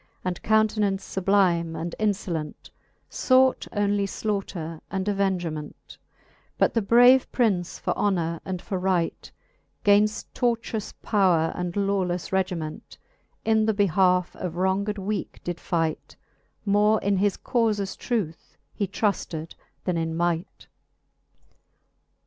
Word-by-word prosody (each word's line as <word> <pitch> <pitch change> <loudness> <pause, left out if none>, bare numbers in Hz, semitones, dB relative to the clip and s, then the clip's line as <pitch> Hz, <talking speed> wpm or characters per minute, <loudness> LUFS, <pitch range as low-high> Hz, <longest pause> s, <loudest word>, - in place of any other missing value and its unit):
And 180 -1 -2
countenance 215 -2 +2
fublime 180 -4 +2
and 170 +1 -4
infolent, 185 -7 -2 0.4
Sought 260 0 +3
onely 205 -1 +1
flaughter 185 -6 -4
and 190 0 -3
avengement: 180 -7 -2 0.6
But - - +3
the 230 - +2
brave 245 +5 +6
Prince 195 -8 0
for - - -2
honour 170 -5 0
and 185 -2 -5
for 190 - -3
right, 180 -3 -1 0.5
Gainft 210 +1 +3
tortious 230 -3 -1
powre 180 -6 +3
and 180 -1 -4
lawleffe 195 -3 -1
regiment, 180 -5 -3 0.5
In 220 -1 +3
the 220 - +2
behalfe 185 -2 +2
of 175 -2 -4
wronged 190 +3 0
weake 200 +2 -4
did 175 -1 -4
fight: 165 -3 -2 0.5
More 210 +1 +3
in 200 0 +1
his 200 0 +1
caufes 215 -5 0
truth 200 -10 -4 0.2
he 200 - -2
trufted 175 -5 -2 0.3
then 180 -2 0
in 165 0 -2
might. 175 +1 -2
195 Hz, 115 wpm, -25 LUFS, 175-210 Hz, 0.6 s, brave